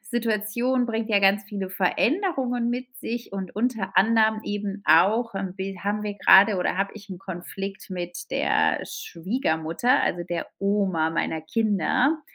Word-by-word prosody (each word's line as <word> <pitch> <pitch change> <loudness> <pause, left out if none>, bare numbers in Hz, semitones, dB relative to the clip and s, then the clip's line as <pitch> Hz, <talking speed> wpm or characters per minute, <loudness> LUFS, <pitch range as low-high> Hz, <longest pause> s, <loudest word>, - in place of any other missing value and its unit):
Situation 235 +2 0
bringt 225 -1 -2
ja 205 -2 +3
ganz 200 +1 +3
viele 195 -2 -5
Veränderungen 245 - 0
mit 250 +1 -2
sich 235 -2 -5
und 190 -2 -5
unter 215 -5 -1
anderem 220 +2 +4
eben 205 -1 -4
auch 205 +8 +4
irgendwie 195 0 -4
'n - - -10
bi 185 - -12
haben 205 +1 -1
wir 210 -1 -3
grade 195 +2 +7
oder 180 0 -1
hab 195 +1 0
ich 210 -2 -12
'n 185 - -6
Konflikt 195 +2 -7
mit 175 -1 -6
der - - +1
Schwiegermutter, 170 - -1
also 175 - -1
der 175 -1 -3
Oma 195 -5 +1
meiner 165 -1 -1
Kinder, 225 - +1
200 Hz, 155 wpm, -25 LUFS, 185-230 Hz, -, grade